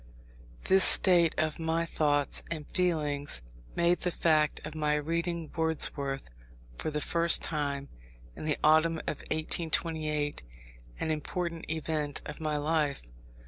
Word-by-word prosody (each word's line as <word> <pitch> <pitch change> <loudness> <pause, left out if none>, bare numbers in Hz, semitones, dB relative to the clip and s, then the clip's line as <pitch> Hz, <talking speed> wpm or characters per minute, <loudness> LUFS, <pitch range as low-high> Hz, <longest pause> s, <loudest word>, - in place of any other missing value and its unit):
This 190 0 +5
state 175 -3 +6
of 155 0 0
my 165 +1 0
thoughts 145 -3 +1
and 155 -3 -4
feelings 150 - -1 0.3
made 170 +1 +2
the 180 - 0
fact 155 -3 +2
of 150 - -6
my 150 -1 0
reading 165 +2 -2
Wordsworth 145 -4 -1 0.5
for - - -2
the 150 0 -2
first 170 +2 +3
time 140 -3 -2 0.5
(in - - -8
the 150 -2 0
autumn 160 +2 +4
of 150 - -3
1828), 155 -2 -1 0.6
an 160 - -1
important 165 +2 -4
event 155 -2 -2
of 150 +2 -8
my 155 -1 -1
life. 150 - 0
155 Hz, 130 wpm, -30 LUFS, 150-165 Hz, 0.6 s, state